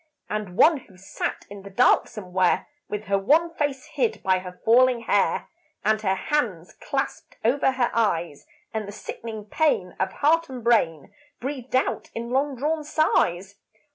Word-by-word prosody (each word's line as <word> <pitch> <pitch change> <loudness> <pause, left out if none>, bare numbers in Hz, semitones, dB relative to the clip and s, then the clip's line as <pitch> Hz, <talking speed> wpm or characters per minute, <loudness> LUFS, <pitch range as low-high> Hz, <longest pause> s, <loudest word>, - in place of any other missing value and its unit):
And 210 -4 -4
one 320 -1 +6
who 215 -8 -15
sat 190 - -4
in 200 -1 -10
the 200 - -10
dark 245 +6 +4
somewhere, 185 -3 0 0.2
With 210 0 -3
her 200 -1 +1
wan 320 +11 +3
face 290 -5 -2
hid 460 -2 -1
by 185 -1 +3
her 180 -1 -10
falling 245 +1 +5
hair, 230 - +1 0.4
And 215 0 +2
her 190 -2 +1
hands 195 - -2
clasped - - -4
over 265 +2 +3
her 250 -2 +1
eyes; 170 -9 0 0.3
And 215 -2 -3
the - - -6
sickening 220 0 -7
pain 210 - 0
of 190 - 0
heart 330 +3 +2
and 255 -3 -7
brain 170 -11 +2 0.3
Breathed 260 -1 -4
out 260 - 0
in 235 +1 -4
long 275 +2 +1
drawn 305 +4 -1
sighs. 200 - +1
225 Hz, 165 wpm, -25 LUFS, 195-270 Hz, 0.4 s, one